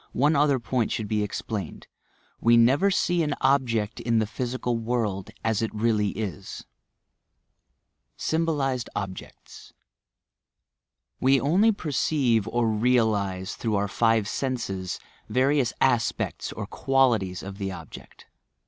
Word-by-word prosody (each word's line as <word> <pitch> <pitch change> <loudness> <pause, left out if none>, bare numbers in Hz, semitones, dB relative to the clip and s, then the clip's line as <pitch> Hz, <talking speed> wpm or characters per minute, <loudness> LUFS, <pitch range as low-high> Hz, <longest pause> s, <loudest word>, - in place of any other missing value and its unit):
one 145 +5 +3
other 140 -2 +3
point 120 -1 -1
should 110 - -2
be 105 0 0
explained: 105 -3 -4 0.5
We 115 +1 +5
never 135 +11 +4
see 175 -2 +1
&a 155 - 0
object 120 -6 +1
in 115 -1 0
the 110 - +2
physical 120 +2 -3
world 110 -4 -2
as 110 -1 +1
it 115 - 0
really 105 -2 +1
is! 100 -3 -5 1.5
STMBOLIZED 145 -7 -1
OBJECTS 95 -2 -8 1.5
We 135 +1 +4
only 185 - +3
perceive 140 - 0
or 120 -1 +1
realize, 110 -5 +1
through 110 -3 -1
our 100 0 +1
five 115 +1 +2
aenses, 100 -7 -3 0.3
various 135 -1 +2
aspects 120 -3 0
or - - -5
qualities 120 -9 +1
of 100 +1 -8
the 95 -1 -3
object. 90 - -11
115 Hz, 120 wpm, -26 LUFS, 105-135 Hz, 1.5 s, We